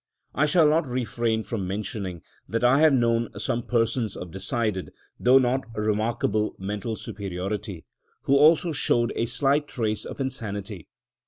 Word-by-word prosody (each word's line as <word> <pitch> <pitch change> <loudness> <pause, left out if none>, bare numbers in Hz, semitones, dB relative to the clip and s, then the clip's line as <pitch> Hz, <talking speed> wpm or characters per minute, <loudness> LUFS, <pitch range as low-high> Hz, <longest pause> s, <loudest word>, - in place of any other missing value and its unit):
I 145 +3 +2
shall 160 0 +5
not 155 0 +2
refrain 115 -2 -1
from 100 -6 -4
mentioning, 95 -3 -4 0.3
that 115 +2 -1
I 125 +3 +5
have 155 0 +6
known 115 -3 +2
some 120 -3 -1
persons 115 -2 0
of 90 - -7
decided, 100 0 -2 0.3
though 125 +2 +6
not 130 -1 +1
remarkable, 110 0 0
mental 105 +4 -4
superiority, 100 -2 -5 0.4
who 140 - +3
also 160 +4 +5
showed 120 -5 +2
a 115 - 0
slight 140 +4 +1
trace 110 -6 -2
of - - -8
insanity. 105 - -5
115 Hz, 145 wpm, -25 LUFS, 105-130 Hz, 0.4 s, have